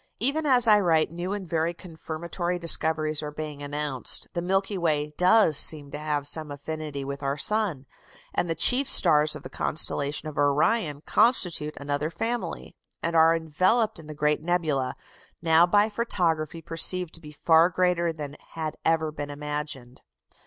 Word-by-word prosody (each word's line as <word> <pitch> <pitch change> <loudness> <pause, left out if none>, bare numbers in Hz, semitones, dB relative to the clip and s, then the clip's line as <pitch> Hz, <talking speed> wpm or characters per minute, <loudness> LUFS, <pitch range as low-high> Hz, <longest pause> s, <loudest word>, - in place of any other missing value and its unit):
Even 290 +6 +4
as 250 -3 +5
I 210 -1 +6
write, 160 -5 +1
new 175 +2 -5
and 200 -3 -6
very 165 +1 -1
confirmatory 170 +1 -5
discoveries 155 -2 +2
are 150 - -5
being 150 -1 -7
announced. 145 -2 -1
The 170 - -3
Milky 195 +3 -1
Way 150 -4 -1
does 180 -4 +4
seem 145 -3 +5
to 150 - -6
have 150 -2 -2
some 155 +1 0
affinity 145 0 -6
with 140 +1 -6
our 140 0 -2
sun. 190 -5 -2 0.5
And 175 - -1
the 165 - -1
chief 250 - +4
stars 150 0 +4
of 150 - -10
the 130 - -9
constellation 145 +1 -1
of 150 - -6
Orion 145 +2 +1
constitute 180 -9 0
another 145 +1 -3
family, 225 +8 -5 0.3
and 170 0 -2
are 165 0 +5
enveloped 185 +8 0
in 155 - -13
the 155 - -9
great 150 +1 0
nebula, 155 -7 -1 0.4
now 165 +1 +4
by 205 +3 +3
photography 170 -8 -2
perceived 175 +1 -2
to 165 - -9
be 150 -2 -12
far 160 +2 +3
greater 180 -1 0
than 150 -2 -8 0.2
had 160 -2 -5
ever 160 -1 0
been 145 -1 -7
imagined. 145 -3 -7
160 Hz, 165 wpm, -25 LUFS, 150-180 Hz, 0.5 s, I